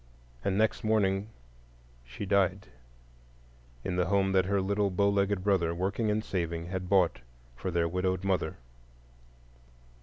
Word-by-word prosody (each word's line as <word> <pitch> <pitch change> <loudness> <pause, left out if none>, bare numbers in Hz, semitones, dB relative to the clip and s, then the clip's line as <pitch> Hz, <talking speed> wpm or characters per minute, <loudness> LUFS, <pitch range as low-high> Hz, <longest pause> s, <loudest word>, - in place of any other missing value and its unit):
And 95 - 0
next 110 +1 +1
morning 105 -2 +1 0.7
she 65 +11 -7
died 95 -9 +1 1.1
in 90 - -2
the 90 -2 +1
home 100 0 +2
that 95 -1 +3
her 100 +1 +1
little 100 +1 +1
bow 100 +2 +2
legged 100 -1 +1
brother, 90 -5 +2
working 100 +5 -1
and 105 +1 0
saving, 85 -3 -2
had 90 -1 -4
bought 90 -9 +3 0.4
for 95 - -4
their 85 -1 +1
widowed 90 +1 -1
mother. 95 -3 0
95 Hz, 140 wpm, -29 LUFS, 90-100 Hz, 1.1 s, that